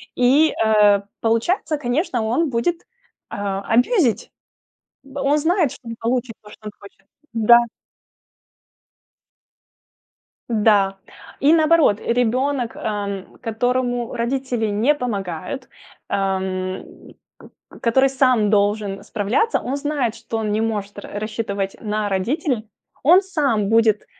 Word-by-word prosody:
И, 275 +6 +4
э, 210 -2 +4 0.2
получается, 265 - 0
конечно, 250 - -1
он 250 +9 0
будет, 275 +8 -1 0.4
а, 200 -2 -3
абьюзить. 245 - +2 0.9
Он 280 +2 +2
знает, 325 -2 +1
что 235 - -12
он 230 - -6
получит 235 0 -1
то, 210 - -14
что 210 0 -10
хочет. 200 -1 -17 0.3
Да. 230 +1 +6 2.9
Да. 210 -3 +3 0.4
И 290 +4 +4
наоборот, 315 -9 +4
ребенок, 245 +1 0
ам, 200 -3 -5
которому 245 +1 -1
родители 245 -1 -1
не 215 +8 +2
помогают, 220 - -4 0.4
ам, 190 -1 -2 0.5
к - - -16 0.2
к - - -14
который 265 +2 +3
сам 255 -5 +2
должен 205 -1 0
справляться, 225 - 0
он 265 +3 -3
знает, 285 -5 -1
что 225 0 -5
он 215 -2 -2
не 210 - 0
может 205 -3 -3
ра - - -10
рассчитывать 210 -3 -3
на 210 -1 -2
родителей. 225 - -1 0.4
Он 350 +7 +6
сам 280 - 0
будет 225 -2 +3
230 Hz, 115 wpm, -21 LUFS, 210-270 Hz, 2.9 s, Да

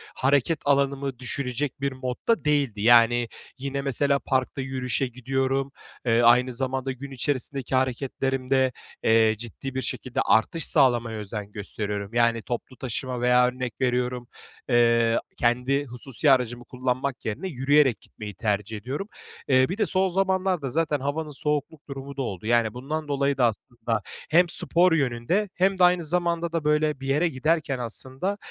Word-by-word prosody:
hareket 145 +4 +2
alanımı 140 -2 +1
düşürecek 130 +2 -3
bir 140 - 0
modda 130 - -2
değildi. 140 -8 +1
Yani, 120 +1 +5 0.3
yine, 140 +1 -3
mesela 140 +1 +1
parkta 130 0 -1
yürüyüşe 130 0 -2
gidiyorum. 135 +2 -1 0.3
Eee, 115 0 +3
aynı 125 +2 +5
zamanda 130 +1 -2
gün 135 +2 -8
içerisindeki 135 0 -2
hareketlerimde, 130 0 0 0.3
eee, 110 -1 +4
ciddi 125 +3 -7
bir 130 - -1
şekilde 130 -1 -3
artış 155 +9 +2
sağlamaya 120 -6 +3
özen 105 0 -6
gösteriyorum. 105 0 -5
Yani, 115 -1 +2
toplu 120 +2 -5
taşıma 125 0 -4
veya 125 0 +4
örnek 125 -2 -4
veriyorum, 125 -1 0 0.4
eee, 115 -1 +4 0.2
kendi 125 +4 +1
hususi 135 +3 0
aracımı 120 -2 +1
kullanmak 130 +1 -3
yerine 110 - -3
yürüyerek 135 - +2
gitmeyi 105 -2 -9
tercih 105 +1 -2
ediyorum. 135 - -5 0.4
Eee, 130 -1 +5
bir 185 - -3
de 210 - +2
son 190 0 +1
zamanlarda 190 -5 0
zaten 150 0 0
havanın 150 +3 -3
soğukluk 150 +1 -3
durumu 140 0 -8
da - - -1
oldu. 100 -6 -5
Yani, 115 -2 +2
bundan 150 +5 -4
dolayı 140 -1 0
da 125 - +4
aslında 115 -1 -2 0.3
hem 175 +2 +4
spor 175 +2 +2
yönünde 145 - 0
hem 190 +1 +2
de 180 - +5
aynı 180 -1 +4
zamanda 170 +1 0
da, 165 -2 -2
böyle, 150 -1 +1
bir 135 - -6
yere 150 +6 +2
giderken 150 -1 0
aslında, 130 - -3
130 Hz, 150 wpm, -25 LUFS, 120-145 Hz, 0.4 s, Yani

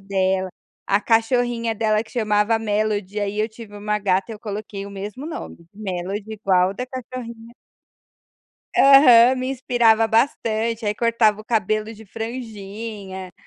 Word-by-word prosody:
dela, 190 -1 0 0.4
a 200 - +3
cachorrinha 230 +1 +1
dela 215 -1 +1
que 220 - -19
chamava 215 -1 +1
Melody, 210 -2 -1
aí 205 +1 -3
eu 215 +1 +1
tive 220 -2 -12
uma 210 +1 -1
gata, 195 +2 0
eu 210 - -10
coloquei 205 -2 -6
o - - -9
mesmo 205 +8 -7
nome, 170 - -8
Melody 195 0 -4
igual 190 -3 +2
o - - -8
da 250 +4 -5
cachorrinha 240 -2 -8 1.2
Aham, 260 -3 +7
me 255 +1 -3
inspirava 235 -4 +3
bastante, 230 -1 0
aí 210 - 0
cortava 230 -2 +2
o - - -13
cabelo 215 -1 -1
de 220 +1 -13
franjinha, 210 -4 -7
215 Hz, 145 wpm, -22 LUFS, 205-230 Hz, 1.2 s, Aham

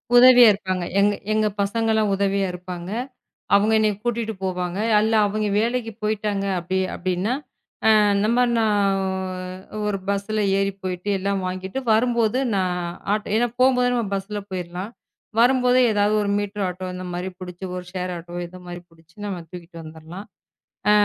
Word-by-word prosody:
உதவியா 245 -1 +9
இருப்பாங்க. 185 -3 -3
எங்க 205 +1 +4 0.2
எங்க 215 0 +2
பசங்கலாம் 220 0 +1
உதவியா 195 0 +1
இருப்பாங்க. 180 0 -7 0.7
அவங்க 210 +2 +3
என்னைய 215 -1 +2
கூட்டிட்டு 230 -2 -1
போவாங்க. 180 -1 -2 0.2
இல்ல 220 +1 +2
அவங்க 210 +1 -1
வேலைக்கு 230 +1 -1
போய்ட்டாங்க. 210 -2 -1
அப்படி 180 +2 -2 0.2
அப்படின்னா 185 +5 -1 0.6
அ - - +6 0.3
நம்ம 240 +3 +3
நா 225 - +3 1.2
ஒரு 205 - 0
பஸ் 200 0 -1 0.3
ஏறிப் 195 0 -2
போயிட்டு 185 +1 -3
எல்லாம் 195 0 -1
வாங்கிட்டு, 185 +6 -4
வரும்போது 235 +1 +2 0.2
நான் 180 -2 0 0.3
ஆட்டோ 210 0 -2
ஏன்னா 240 - +2
போகும்போது 245 -3 +3
பஸ்ல 205 +2 -4
போயிரலாம். 180 +3 -5 0.5
வரும்போது 250 +1 +4
ஏதாவது 205 0 +2
ஒரு 205 - -1
மீட்டர் 205 0 -2
ஆட்டோ 180 +1 -5
இந்த 180 - -6
மாரி 180 +1 -3
புடிச்சு 180 0 -7
ஒரு 180 - -7
ஷேர் 185 -1 -3
ஆட்டோ 175 +1 -7
மாதிரி 175 0 -7
புடிச்சு 165 0 -24
நாம 190 -4 -4
தூக்கிட்டு 175 -1 -11
வந்துடலாம். 160 +5 -10 0.6
அ - - +7
200 Hz, 145 wpm, -23 LUFS, 180-220 Hz, 1.2 s, உதவியா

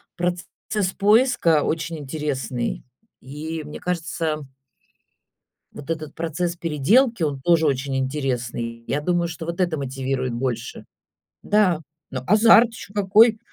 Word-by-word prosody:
процесс 180 +2 -3
поиска 210 - +4
очень 165 +1 -2
интересный, 135 -4 -3 0.4
и, 155 +4 -6
мне 150 0 -8
кажется 165 -3 -2 1.3
Вот 145 +2 -10
этот 155 -2 -5
процесс 170 +2 -2
переделки, 175 - +2
он 140 -3 -2
тоже 165 +2 +3
очень 135 -1 -1
интересный. 125 -4 -3
Я 145 - -1
думаю, 175 +1 +1
что 165 -1 -7
вот 170 +2 -5
это 175 -4 +1
мотивирует 130 -2 -2
больше. 120 -2 -3 0.6
Н-да, 195 -6 +3 0.3
но 130 -1 -5
азарт 225 - +6
ещё 215 -2 -11
какой! 215 +3 +5
160 Hz, 120 wpm, -23 LUFS, 135-180 Hz, 1.3 s, азарт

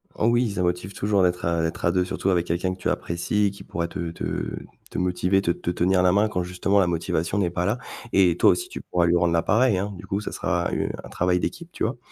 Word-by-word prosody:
Oh 110 - +1
oui, 120 -1 +2
ça 100 -2 -2
motive 90 +2 -1
toujours 100 -1 +1
d'être 90 0 +1
à 85 -1 +1
d'être 80 +1 -2
à 85 - +4
2 90 0 +1
surtout 95 +1 -2
avec 85 -2 +2
quelqu'un 90 +2 0
que 95 - -11
tu - - -1
apprécies 85 +5 0
et - - -1
qui 100 - -12
pourrait 85 0 -3
te 85 -1 -4
te - - -8 0.7
te - - -6
motiver, 90 +1 +1
te 85 - +1
te 85 - -4
tenir 90 +1 +2
la 90 -1 +4
main 105 +2 +3
quand 90 -3 -1
justement 90 +3 +1
la 95 - +3
motivation 85 +2 -1
n'est 90 -4 +2
pas 85 +1 -2
là, 105 +5 +1 0.4
et 90 -3 +4
toi - - +6
aussi, 365 0 -2
tu - - -7
pourras 90 -1 0
lui 85 +1 +3
rendre 85 0 +2
la 85 - +3
pareille, 110 0 +3
hein. 100 +3 -2
Du 95 +1 -11
coup, 100 +2 -1
ça - - -5
sera, 85 -1 -1
heu, - - 0
un - - -10
travail 90 0 +1
d'équipe, 170 0 -4
tu - - -3
vois? 115 +4 -1
90 Hz, 270 wpm, -24 LUFS, 85-100 Hz, 0.7 s, toi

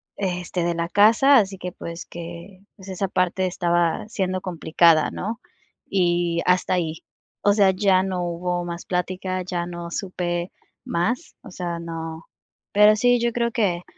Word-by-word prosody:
este, 180 -2 -2
de 170 0 +1
la 170 0 -2
casa, 225 +9 +6
así 195 -3 +1
que 180 0 -5
pues 170 0 -7
que 170 +2 -9 0.2
pues 190 -1 -12
esa 190 +1 -2
parte 185 0 +1
estaba 175 +1 0
siendo 185 -4 -2
complicada, 165 -2 +3
¿no?, 220 +3 -4 0.5
y 175 -2 +1
hasta 180 0 +2
ahí. 165 -2 -3 0.4
O 205 - +4
sea, 200 -2 +5
ya 190 -1 +3
no 185 -2 -2
hubo 175 +1 -2
más 170 0 -6
plática, 185 +1 -2
ya 175 -1 -3
no 170 -1 -7
supe 175 -2 -3 0.3
más, 240 - -2
o 205 - -11
sea, 175 -2 -4
no, 165 -1 -6 0.5
pero 210 +1 +7
sí, 245 +2 +3
yo 235 0 +1
creo 235 0 0
que 185 -7 0
180 Hz, 160 wpm, -23 LUFS, 170-195 Hz, 0.5 s, pero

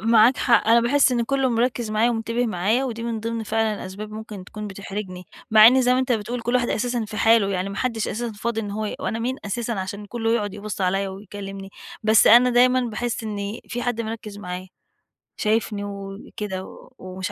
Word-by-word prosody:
معاك 225 +2 +5
حق، 235 -3 +3
أنا 235 +1 +6
باحس 265 +2 +3
إن 240 -1 +1
كّله 270 +1 +1
مركِّز 240 -1 0
معايّا، 220 +3 +2
ومنتبه 230 +1 -1
معايّا 215 +6 +1
ودي 230 -3 -4
من 230 -1 -3
ضمن 230 +1 -3
فعلًا 220 0 0
الأسباب 200 +2 -7
ممكن 215 -3 -8
تكون 210 +3 -7
بتحرجني، 195 -2 -6 0.3
مع 215 0 +9
إن 260 +3 +6
زي 250 0 +3
ما 255 - +3
أنتَ 260 -1 +1
بتقول 230 +2 -2
كل 240 +2 -2
واحد 245 -1 +2
أساسًا 240 0 -1
في 215 0 -8
حاله، 225 -3 +4
يعني 185 0 -1
ما 200 - -6
حدش 230 -4 -1
أساسًا 235 +1 -3
فاضي 225 +2 -2
إن 205 - -5
هو 215 +2 -3
ي - - -5
وأنا 225 - -2
مين 250 +3 -2
أساسًا 230 +3 -2
عشان 205 0 -5
كلّه 225 +1 -2
يقعد 205 -4 -1
يبص 205 0 -6
عليَّ 195 +1 +1
ويكلمني، 195 0 -8 0.3
بس 220 0 +5
أنا 245 +2 +7
دايمًا 250 +1 +4
باحس 235 -1 -3
إنِ 215 -1 -4 0.3
في 245 0 -3
حد 245 -2 -1
مركز 220 -2 -6
معايّا، 180 -1 -6 0.7
شايفني 215 -1 0
وكده 195 -1 -6
و - - -14
ومش 185 0 -6
220 Hz, 205 wpm, -23 LUFS, 205-235 Hz, 0.7 s, مع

